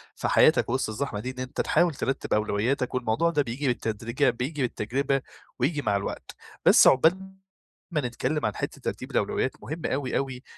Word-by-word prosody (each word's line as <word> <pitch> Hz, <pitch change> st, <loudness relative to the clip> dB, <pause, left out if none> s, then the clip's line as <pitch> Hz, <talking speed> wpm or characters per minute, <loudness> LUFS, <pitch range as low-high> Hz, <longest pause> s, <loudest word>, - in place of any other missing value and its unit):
في -, -, -2 dB
حياتك -, -, +4 dB
وسط 130 Hz, -2 st, 0 dB
الزحمة 110 Hz, -1 st, -3 dB
دي، 125 Hz, +5 st, -4 dB
إن 130 Hz, -, -11 dB
أنت 130 Hz, +2 st, -3 dB
تحاول 175 Hz, -3 st, +2 dB
ترتب 135 Hz, +1 st, -2 dB
أولوياتك، 110 Hz, +5 st, 0 dB
والموضوع 125 Hz, +7 st, +1 dB
ده 150 Hz, -3 st, +1 dB
بييجي 135 Hz, +3 st, -3 dB
بالتدريجة 120 Hz, +3 st, 0 dB
بييجي 135 Hz, +5 st, -3 dB
بالتجربة 130 Hz, +3 st, -1 dB, 0.4 s
وييجي 145 Hz, +3 st, +1 dB
مع 100 Hz, -4 st, +1 dB
الوقت، 100 Hz, -, -5 dB, 0.3 s
بس -, -, +8 dB
عقبال 185 Hz, +8 st, +3 dB, 0.6 s
ما 150 Hz, -3 st, 0 dB
نتكلم 130 Hz, +4 st, -2 dB
عن 105 Hz, -, -1 dB
حتّة -, -, -5 dB
ترتيب -, -, -5 dB
الأولويات، -, -, 0 dB
مهم 160 Hz, +1 st, -5 dB
أوي 130 Hz, -1 st, -1 dB
أوي 130 Hz, -2 st, -3 dB
130 Hz, 170 wpm, -26 LUFS, 120-145 Hz, 0.6 s, بس